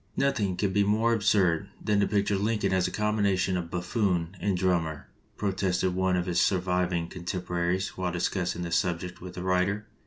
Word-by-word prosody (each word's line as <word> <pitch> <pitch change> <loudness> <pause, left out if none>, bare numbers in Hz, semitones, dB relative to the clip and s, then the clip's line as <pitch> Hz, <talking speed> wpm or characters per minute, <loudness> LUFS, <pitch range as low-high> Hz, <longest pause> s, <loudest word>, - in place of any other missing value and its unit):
"Nothing 105 -10 +1
can 100 -2 0
be 100 +1 +3
more 110 +3 +2
absurd 100 -4 +2
than 105 -1 +1
to 100 - +3
picture 100 -1 +1
Lincoln 105 -1 0
as 95 -1 +2
a - - -5
combination 100 -3 +1
of 85 -2 -3
buffoon 90 -1 -1
and 95 0 0
drum 90 -2 +2
mer," 80 -2 -7 0.3
protested 95 -2 0
one 95 0 +1
of 90 - -1
his 90 -1 +1
surviving 90 -2 +1
contem 90 0 -5
poraries 90 +2 0
while 90 -1 -3
discussing 90 0 -1
this 85 - +1
subject 90 0 -2
with 90 0 -8
the 90 - -5
writer. 95 +3 +1
95 Hz, 185 wpm, -28 LUFS, 90-100 Hz, 0.3 s, be